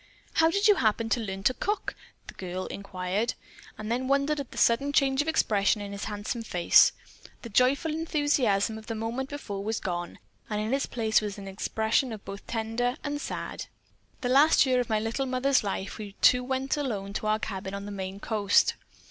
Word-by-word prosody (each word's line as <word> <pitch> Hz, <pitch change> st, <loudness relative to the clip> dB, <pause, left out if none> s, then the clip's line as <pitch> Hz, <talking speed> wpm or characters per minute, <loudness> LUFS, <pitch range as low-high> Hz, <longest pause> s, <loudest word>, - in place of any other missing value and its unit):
"How 320 Hz, 0 st, +4 dB
did 400 Hz, +5 st, +2 dB
you 415 Hz, -2 st, +6 dB
happen 225 Hz, -1 st, +1 dB
to 235 Hz, -, +2 dB
learn 195 Hz, -4 st, -4 dB
how -, -, -14 dB
to 255 Hz, -, +4 dB
cook?" 415 Hz, +10 st, -2 dB, 0.3 s
the -, -, -10 dB
girl 185 Hz, 0 st, -5 dB
inquired, 200 Hz, +2 st, -3 dB, 0.4 s
and 215 Hz, +1 st, -5 dB
then 255 Hz, +2 st, -1 dB
wondered 280 Hz, +2 st, +2 dB
at 275 Hz, -, -5 dB
the -, -, -12 dB
sudden 255 Hz, +5 st, +3 dB
change 270 Hz, -1 st, +3 dB
of 295 Hz, -, -4 dB
expression 210 Hz, -9 st, +2 dB
in 200 Hz, -1 st, -6 dB
his 200 Hz, 0 st, -5 dB
handsome 210 Hz, +3 st, -4 dB
face. 180 Hz, -6 st, +5 dB, 0.5 s
The 235 Hz, -, -7 dB
joyful 255 Hz, +8 st, +2 dB
enthusiasm 290 Hz, -10 st, +1 dB
of 220 Hz, -, -15 dB
the 225 Hz, -, -3 dB
moment 230 Hz, +5 st, -3 dB
before 205 Hz, -9 st, -5 dB
was 220 Hz, +1 st, -1 dB
gone 175 Hz, -2 st, -4 dB, 0.3 s
and 210 Hz, -, -1 dB
in 215 Hz, +4 st, -1 dB
its 275 Hz, -, 0 dB
place 220 Hz, -3 st, +1 dB
was 210 Hz, -1 st, -4 dB
an 195 Hz, -1 st, -8 dB
expression 220 Hz, +4 st, -1 dB
both 200 Hz, +1 st, -8 dB
tender 235 Hz, +3 st, -1 dB
and 290 Hz, 0 st, -3 dB
sad. -, -, -5 dB, 0.5 s
"The 245 Hz, -, -1 dB
last 280 Hz, +3 st, +6 dB
year 255 Hz, -1 st, +2 dB
of 245 Hz, -, -2 dB
my 215 Hz, -1 st, +2 dB
little 230 Hz, +5 st, -2 dB
mother's 260 Hz, +1 st, +2 dB
life 195 Hz, +1 st, -4 dB
we 205 Hz, -2 st, -7 dB
two 250 Hz, 0 st, +5 dB
went 265 Hz, +2 st, -1 dB
alone 205 Hz, -9 st, -3 dB
to 215 Hz, -, -3 dB
our 215 Hz, 0 st, +3 dB
cabin 195 Hz, -2 st, -5 dB
on 200 Hz, 0 st, -6 dB
the 205 Hz, -, -6 dB
Maine 190 Hz, 0 st, -5 dB
coast. 205 Hz, -2 st, +3 dB
225 Hz, 200 wpm, -28 LUFS, 200-265 Hz, 0.5 s, you